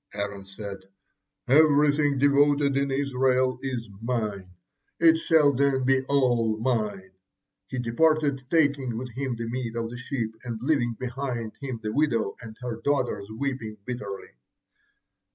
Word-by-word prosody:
Aaron 100 -1 -4
said, 100 0 -7 0.7
'Everything 145 0 +4
devoted 145 0 +3
in 140 0 +1
Israel 130 -2 +1
is 125 -4 -3
mine. 110 -6 -2 0.5
It 165 -1 +6
shall 155 -3 +4
then 135 0 +2
be 130 +1 +3
all 120 -6 +2
mine.' 105 -6 -1 0.6
He 130 - -5
departed, 140 +3 +2
taking 140 -7 +2
with 125 +1 -5
him 130 +1 -3
the 115 0 -5
meat 120 -1 -4
of 115 0 -3
the 120 - -7
sheep, 120 -4 -3
and 120 -3 -5
leaving 120 -3 +1
behind 125 -3 -4
him 130 -4 -5
the 105 0 -2
widow 120 -9 +1
and 110 -2 -10
her 120 -2 -5
daughters 130 -8 0
weeping 115 -2 -4
bitterly. 105 -6 -6
125 Hz, 135 wpm, -26 LUFS, 115-140 Hz, 0.7 s, It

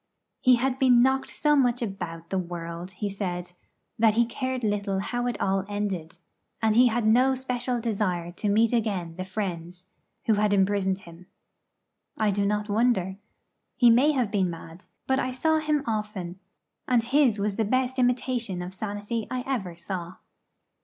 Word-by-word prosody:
He 255 -1 +5
had 260 +2 -1
been 245 -2 +6
knocked 265 +1 +1
so 300 -1 +2
much 245 -3 +2
about 170 -5 -6
the 190 - +1
world, 170 0 -6
he 205 +3 -3
said, 180 -3 -4 0.5
that 220 -1 +4
he 235 +1 +4
cared 255 +1 -3
little 205 -2 0
how 245 +5 -2
it 245 - -3
all 195 0 +1
ended; 190 -5 -3 0.4
and 220 -1 +2
he 250 +2 +7
had 235 -1 0
no 250 +4 +4
special 250 -1 -2
desire 195 -7 -1
to 205 +4 -3
meet 225 +3 +3
again 200 -8 -1
the 185 - -4
friends 180 -2 -5 0.4
who 225 - +4
had 210 0 +2
imprisoned 195 -1 +1
him. 170 -1 -14 0.9
I 215 -1 +2
do 200 0 0
not 210 0 -1
wonder. 205 -4 +1 0.6
He 240 -3 +6
may 270 +6 +5
have 245 -7 0
been 190 -4 +1
mad; 165 +1 -10 0.2
but 265 0 +1
I 255 - -1
saw 315 +5 +1
him 300 -2 0
often, 210 -5 -4 0.5
and 245 -3 +3
his 260 -2 +3
was 200 0 -1
the 225 - +2
best 255 +4 0
imitation 245 -6 0
of 180 +1 -6
sanity 205 +3 -4
I 255 -1 -3
ever 200 -11 -3
saw. 175 0 -6
210 Hz, 170 wpm, -26 LUFS, 185-245 Hz, 0.9 s, he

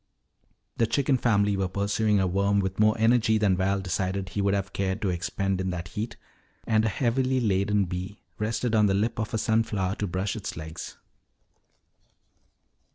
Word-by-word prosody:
The 115 - +2
chicken 135 +3 +2
family 100 -4 +2
were 95 -1 0
pursuing 100 +2 +1
a 95 - +2
worm 100 +2 +1
with 95 0 -2
more 110 0 +4
energy 115 0 +3
than 105 -3 +3
Val 95 +1 0
decided 95 +1 -2
he 100 - -2
would 100 0 +2
have 95 -1 -3
cared 95 0 -1
to 100 - +1
expend 95 +2 -2
in 95 - -2
that 85 -2 -4
heat, 110 +6 -5 0.5
and 110 -1 +2
a 110 - +2
heavily 130 +4 +1
laden 100 -2 +1
bee 90 +3 -6 0.2
rested 115 +2 -1
on 105 -2 +4
the 95 - +2
lip 110 +3 0
of 110 - -2
a - - +2
sunflower 105 -4 0
to 105 - -2
brush 95 +3 -2
its - - -5
legs. 80 +2 -7
100 Hz, 175 wpm, -26 LUFS, 95-110 Hz, 0.5 s, more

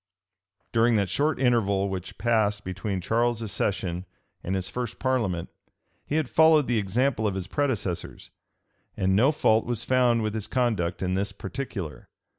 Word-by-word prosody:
During 115 0 +4
that 100 -3 +1
short 150 -1 +1
interval 105 -6 +2
which 95 -2 -6
passed 110 -3 +1
between 95 +1 -3
Charles's 115 +2 0
accession 90 -2 -2 0.4
and 95 - -2
his 95 -1 -2
first 125 -1 -4
parliament, 110 -10 -1 0.6
he 150 - -2
had 155 -4 +1
followed 160 0 +5
the 120 -3 +1
example 110 +3 +1
of 100 - -2
his 95 -2 -3
predecessors; 110 - -3 0.7
and 95 0 +2
no 125 +8 +5
fault 110 -7 +3
was 115 -2 -3
found 125 -3 +3
with 105 -1 -1
his 110 -2 -3
conduct 100 -9 0
in 90 0 0
this 100 +2 -1
particular. 100 - -6
110 Hz, 155 wpm, -26 LUFS, 95-125 Hz, 0.7 s, followed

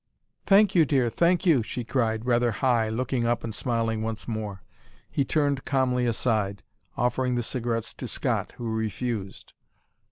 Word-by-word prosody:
"Thank 205 0 +6
you, 170 - +6
dear 130 -5 +1
thank 175 - +2
you," 155 -9 +5
she 120 +2 -4
cried, 110 -2 -1
rather 120 -1 +3
high, 115 0 +1
looking 120 +1 -1
up 120 0 0
and 115 - -4
smiling 115 -1 -1
once 110 -1 -4
more. 105 -4 -4 0.5
He 140 - +1
turned 140 -1 0
calmly 125 -2 +1
aside, 110 -4 0 0.3
offering 125 +1 +1
the 120 - 0
cigarettes 115 -1 -2
to - - -7
Scott, - - -2
who 120 - -5
refused. 110 -2 -4
120 Hz, 155 wpm, -26 LUFS, 110-130 Hz, 0.5 s, Thank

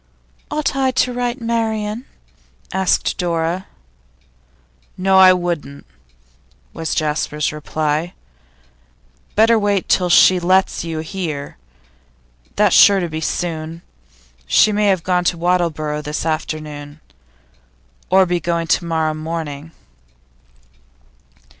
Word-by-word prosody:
'Ought 300 -2 -1
I 265 -1 +1
to 255 -1 0
write 245 0 -2
to 240 - -12
Marian?' 225 0 -2 0.7
asked 190 +1 0
Dora. 170 +1 -1 1.3
'No; 190 +1 +3
I 185 -1 +8
wouldn't,' 175 -6 -3 0.9
was 160 -2 -3
Jasper's 150 -1 -1
reply. 155 +2 -2 1.2
'Better 225 +1 +4
wait 205 -2 0
till 180 -1 +2
she 185 +1 +6
lets 185 +1 +1
you 165 -2 -4
hear. 160 - -5 1.0
That's 210 -3 +3
sure 200 -1 +7
to 175 -2 -3
be 160 0 -5
soon. 165 0 -4 0.6
She 215 - +4
may 210 0 +1
have 190 -4 +1
gone 180 -1 +1
to 175 - +1
Wattleborough 165 -4 -1
this 150 +1 -4
afternoon, 155 -2 -4 1.1
or 190 0 +5
be 175 -1 -1
going 170 -1 -1
to 170 +1 +1
morrow 160 -2 0
morning. 155 -1 -6
175 Hz, 110 wpm, -18 LUFS, 155-190 Hz, 1.3 s, I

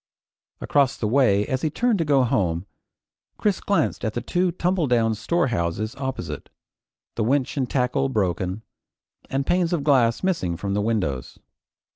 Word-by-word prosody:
Across 140 -3 +2
the 110 - -1
way 105 -5 +3
as 130 0 -2
he 155 - +1
turned 230 +5 +1
to 165 - +1
go 140 -3 +4
home, 95 -9 0 0.7
Chris 205 -3 +1
glanced 200 - 0
at 110 -2 -2
the - - 0
two 180 0 0
tumbledown 145 -12 +1
storehouses 110 - -1
opposite, 130 -1 -5 0.6
the 115 - -1
winch 130 +3 +1
and 130 -4 -1
tackle 135 +1 +1
broken, 95 -2 -1 0.7
and 135 0 -1
panes 175 +1 +1
of 160 -5 0
glass 125 -4 +3
missing 95 - 0
from 100 +2 -3
the 105 - +1
windows. 95 - -2
125 Hz, 150 wpm, -24 LUFS, 105-145 Hz, 0.7 s, go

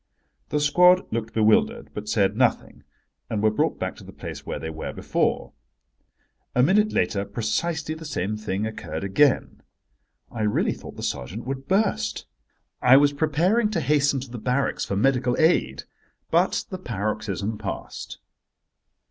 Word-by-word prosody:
The 150 - 0
squad 180 +5 +5
looked 115 -1 -2
bewildered, 215 - +2
but 105 0 -6
said 100 -3 +2
nothing, 125 0 0 0.5
and 105 -2 -2
were 110 - +4
brought 105 - 0
back - - -3
to - - -12
the - - -11
place - - -8
where - - -3
they 80 - -5
were 80 0 -5
before. - - -1 1.0
A 125 - +4
minute 210 +8 +3
later 100 -3 0
precisely 150 +10 -2
the 160 +1 -9
same 105 - -2
thing 105 -1 -3
occurred 85 -7 -5
again. 130 +9 +2 0.7
I 115 - -5
really 105 -1 +1
thought - - -11
the - - -8
sergeant 90 - -4
would 135 +1 -5
burst. 215 +2 0 0.6
I 125 +2 +7
was 145 0 +4
preparing 170 +10 +2
to 200 -5 -1
hasten 145 -3 +2
to 130 -2 -9
the 120 - -6
barracks 125 +4 0
for 100 - -3
medical 125 +2 +2
aid. 160 +2 +2 0.5
But - - +2
the 185 - -5
paroxysm 105 - -3
passed. 100 -3 -6
125 Hz, 155 wpm, -24 LUFS, 105-160 Hz, 1.0 s, I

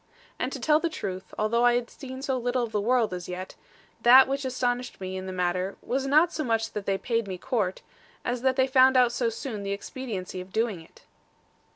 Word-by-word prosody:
And 255 - -1
to 275 - -5
tell 300 +4 +3
the 335 - -1
truth, 190 - -6
although 235 +3 +1
I 240 0 +5
had 240 -1 -2
seen 260 -1 -8
so 270 -2 0
little 245 0 0
of 230 - -4
the 210 - 0
world 235 -2 +2
as 180 0 -6
yet, 185 +1 -6 0.5
that 255 +2 +8
which 275 +1 -2
astonished 250 -1 -2
me 190 0 -5
in 190 0 -5
the - - -4
matter, 180 +1 -1
was 270 +2 -1
not 310 +5 +4
so 310 - -2
much 225 -3 0
that 205 -2 -6
they 195 -1 +1
paid 230 0 -1
me 185 -1 -4
court, 210 -4 -2 0.4
as 245 0 -1
that 260 0 +2
they 260 - +4
found 260 0 +5
out 250 -2 +5
so 240 -1 0
soon 225 -1 -5
the 200 0 -2
expediency 200 -4 -5
of 185 +1 -12
doing 220 -4 -1
it. 160 - -19
240 Hz, 225 wpm, -27 LUFS, 195-260 Hz, 0.5 s, that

